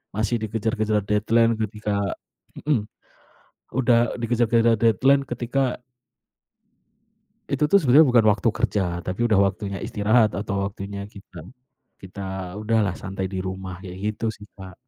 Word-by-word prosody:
Masih 110 +2 0
dikejar-kejar 110 -1 -1
deadline 115 +3 +2
ketika 105 -1 -2 0.7
mhm. 120 -9 +1 0.9
Udah 120 -2 +2
dikejar-kejar 115 -1 +2
deadline 135 +5 +3
ketika 125 +1 -2 1.7
itu 140 +2 0
tuh 200 +7 +5
sebenarnya 145 +3 +6
bukan 120 -3 +5
waktu 105 +2 +2
kerja, 110 -3 0 0.2
tapi 95 +6 -1
udah 110 -4 +3
waktunya 100 0 -5
istirahat, 110 +2 +2
atau 100 -1 -3
waktunya 100 0 -7
kita 100 -5 -12 0.6
kita 95 +1 -9 0.4
udahlah 110 -4 +1
santai 95 -1 -5
di 95 - -5
rumah, 95 -1 -6
kayak 90 -1 -9 0.2
gitu 115 - -5
sih 105 - -13
Kak. 95 -1 -10
110 Hz, 125 wpm, -23 LUFS, 100-120 Hz, 1.7 s, sebenarnya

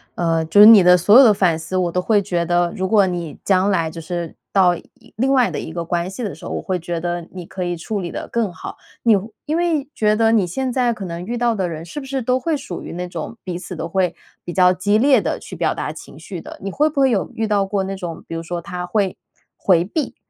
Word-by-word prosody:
呃， 165 -2 +1
就 185 +6 +3
是 210 - +11
你 215 -5 +9
的 180 0 +7
所 205 +7 +6
有 270 - +10
的 220 -4 +6
反 175 -5 +2
思 165 +3 -4
我 180 -2 0
都 180 - 0
会 205 +2 +2
觉 175 -3 -1
得， 175 0 +1
如 190 0 -2
果 205 -3 +4
你 170 -5 -4
将 190 0 +3
来 165 -5 +1
就 165 +1 -8
是 170 0 -5 0.2
到 180 -3 +4
一 235 +6 -17
另 260 +5 +1
外 255 -3 +4
的 - - -4
一 160 - -6
个 170 0 -4
关 175 +1 -1
系 235 +5 -6
的 190 -9 -4
时 - - -17
候， - - -5
我 - - -3
会 185 -2 -2
觉 170 0 -4
得 175 0 -3
你 180 -2 -8
可 185 - -5
以 175 -1 -2
处 200 +5 -4
理 175 - -5
得 - - -6
更 230 -5 -1
好。 - - -8 0.3
你 230 -3 +5
会 205 +3 -3 0.2
因 310 +1 -1
为 330 -6 0
觉 215 -1 +2
得 225 0 +3
你 205 -5 +3
现 255 +8 -3
在 245 -2 +1
可 200 -3 -7
能 170 0 -6
遇 240 +4 -3
到 235 -1 +1
的 185 -3 -1
人 165 0 -6
是 295 - -7
不 270 - -9
是 265 -1 -3
都 250 +2 +1
会 310 +3 -1
属 180 - -7
于 - - -7
那 180 +1 -4
种 175 +6 -7
彼 175 -2 -3
此 180 0 -8
都 160 +1 -4
会 180 -1 0 0.3
比 - - -6
较 180 0 +4
激 205 +3 +1
烈 270 +3 +4
地 - - -2
去 - - -10
表 - - 0
达 - - -4
情 - - -12
绪 - - -8
的？ 315 0 -11
你 195 - -4
会 300 +7 +2
不 285 -2 -3
会 270 -1 +5
有 - - -1
遇 225 -1 -1
到 205 -2 +1
过 195 0 -1
那 195 0 -4
种， 175 -4 -7
比 165 - -6
如 165 - -4
说 170 0 -4
他 180 0 -5
会 190 +1 0 0.4
回 175 -2 +2
避， 295 - -3
190 Hz, 300 characters per minute, -20 LUFS, 175-225 Hz, 0.4 s, 是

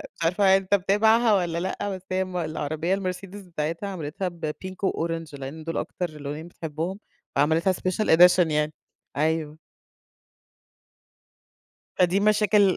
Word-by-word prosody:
مش - - -6
عارفة 190 +3 +4
أنت 195 0 -3
متابعها 220 +4 +4
والّا 175 -4 +1
لأ؟ 190 +3 -2
بس 190 -1 -5
هي 185 0 +1
م 185 -1 -5
العربية 155 +1 -2
المرسيدس 195 +1 -4
بتاعتها 165 +1 -4
عملتها 180 0 -4
بpink 170 +2 -6
وorange 165 -3 -4
لأن 140 +4 -7
دول 165 +1 -3
أكتر 175 -3 -3
لونين 150 +2 -6
بتحبهم 165 +3 -5 0.4
فعملتها 160 +6 +3
special 185 +3 -1
edition 180 -1 +6
يعني 150 0 0 0.4
أيوه. 155 0 0 2.4
فا 185 - +5
دي 180 +3 +1
مشاكل 210 -2 +4
175 Hz, 130 wpm, -25 LUFS, 160-190 Hz, 2.4 s, edition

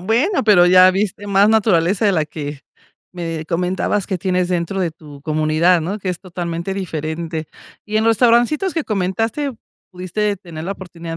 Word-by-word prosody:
Bueno, 240 - +1
pero 180 -5 +6
ya 185 +1 +7
viste 200 +1 -2
más 200 +1 +4
naturaleza 200 -3 +2
de 200 - +4
la 155 -3 +1
que 145 -2 -7 0.5
me 165 -3 -5
comentabas 180 +4 -1
que 190 -3 -2
tienes 180 0 0
dentro 180 +2 -1
de 175 - 0
tu 150 -3 -14
comunidad, 155 +3 +2
¿no?, 195 +7 -3
que 190 - -5
es 175 - -5
totalmente 175 0 -4
diferente. 160 -3 -4 0.4
¿Y 215 0 -3
en 220 - +2
los 230 - +5
restaurancitos 245 - +2
que 325 - -1
comentaste, 225 +8 -1 0.4
pudiste 195 +3 -2
tener 170 -4 -9
la 195 - -2
oportunidad 170 -3 -8
185 Hz, 170 wpm, -19 LUFS, 165-210 Hz, 0.5 s, ya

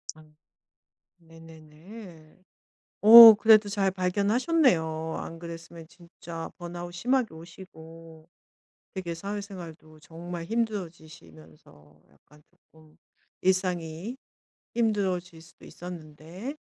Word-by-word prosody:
아. 155 - -17 1.0
네네네. 165 +2 -16 0.6
어 225 +1 +11
그래도 215 -1 +4
잘 200 -2 -1
발견하셨네요. 190 - 0
안 165 0 -9
그랬으면 165 -1 -11
진짜 170 -1 -11
번아웃 175 0 -8
심하게 245 +3 -1
오시고 165 -1 -14 0.7
되게 175 -3 -6
사회생활도 175 -5 -9
정말 170 +2 -9
힘들어지시면서 155 - -8
약간 150 - -25 0.3
쪼금 155 -1 -22 0.4
일상이 185 +2 -2 0.6
힘들어질 190 -7 -2
수도 165 - -19
있었는데 175 - -10
170 Hz, 230 characters per minute, -26 LUFS, 160-200 Hz, 1.0 s, 어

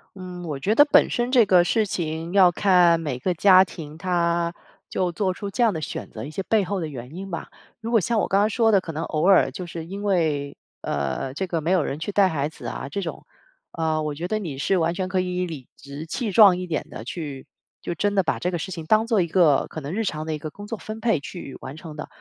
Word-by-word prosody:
嗯， 180 -2 -8
我 140 -3 -4
觉 210 +9 +1
得 290 - +7
本 290 - +5
身 240 +1 -1
这 245 -3 +6
个 180 -2 +6
事 215 +3 +1
情 165 -1 -3
要 185 -3 +6
看 175 -3 +4
每 145 -6 -3
个 180 +8 -1
家 185 +2 +6
庭 155 -3 -9
它， 170 -1 0 0.3
就 180 -2 -1
做 185 +1 -1
出 200 +2 -6
这 240 - 0
样 225 -4 +3
的 160 - -4
选 - - -5
择 - - -7
一 140 - -6
些 190 +5 -4
背 215 +1 +2
后 195 +2 -2
的 160 - -3
原因 150 +9 -8
吧。 170 - -5 0.3
如 225 - -4
果 230 -2 +4
像 225 +4 0
我 - - 0
刚 195 - +2
刚 210 - +4
说 225 0 +2
的， 200 - +5
可 180 -3 -7
能 160 +1 -4
偶 155 +2 -1
尔 195 -2 +6
就 185 -3 -7
是 165 -1 -7
因 200 +2 -6
为， 155 -8 0 0.3
呃， 70 - -2
这 190 +5 -3
个 165 -2 -2
没 170 +4 -1
有 180 -5 +3
人 140 - -3
去 160 +6 -4
带 195 -1 +4
孩 145 -4 -1
子 155 - -9
啊 140 - -5
这 200 - -3
种， 170 - -6 0.5
呃， 160 -1 -1
我 150 -1 -2
觉 165 +5 -4
得 215 +3 -1
你 155 -10 -5
是 190 +6 +1
完 165 -1 +1
全 185 +1 -3
可 190 -1 0
以 180 0 -1
理 145 -7 -8
直 140 +3 -9
气 210 +6 -3
壮 190 -3 +7
一 180 - -5
点 155 -4 -3
地 - - -7
去， 140 0 -6 0.3
就 175 - -4
真 205 0 0
的 195 - +3
把 - - -1
这 180 - -2
个 175 - -2
事 190 - -5
情 165 -3 -6
当 215 +5 +3
做 225 -4 +2
一 170 - +1
个， 160 -5 +4
可 160 - -7
能 140 +4 -5
日 225 +3 -1
常 155 -6 -3
的 155 - -1
一 - - -4
个 155 +1 -7
工 205 +4 -10
作 225 +1 -4
分 215 +1 -7
配 225 -8 +1
去 140 -2 -8
完 130 +2 -8
成 155 -1 -10
的。 150 - -6
175 Hz, 290 characters per minute, -24 LUFS, 155-195 Hz, 0.5 s, 得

